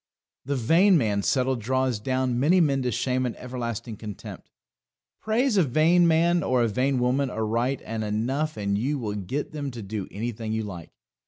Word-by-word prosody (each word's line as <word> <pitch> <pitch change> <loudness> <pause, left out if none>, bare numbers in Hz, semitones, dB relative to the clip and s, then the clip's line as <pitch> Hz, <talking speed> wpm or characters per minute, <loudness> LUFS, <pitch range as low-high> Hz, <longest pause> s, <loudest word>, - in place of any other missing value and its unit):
The 140 +2 -1
Vain 170 - +4
Man's 105 -7 0
Settle 130 0 +2
draws 130 0 0
down 130 +1 -1
many 165 +8 +4
men 140 -5 +2
to 125 -1 -1
shame 130 +4 0
and 125 -2 -3
everlasting 120 -3 -5
contempt. 105 -3 -9 0.7
Praise 225 +1 +1
a 185 - +5
vain 160 +5 +4
man 170 +2 +3
or 130 -4 +2
a - - +2
vain 130 +5 0
woman 125 +2 +1
aright 115 +4 -1
and 110 0 -3
enough 125 +9 -1
and 100 -1 -1
you 140 +6 -1
will 110 -6 -3
get 105 +9 -4
them 145 -2 -4
to 120 -4 -8
do 100 -1 -5
anything 110 +1 -4
you 110 0 -1
like. 90 -6 -8
125 Hz, 180 wpm, -25 LUFS, 110-145 Hz, 0.7 s, a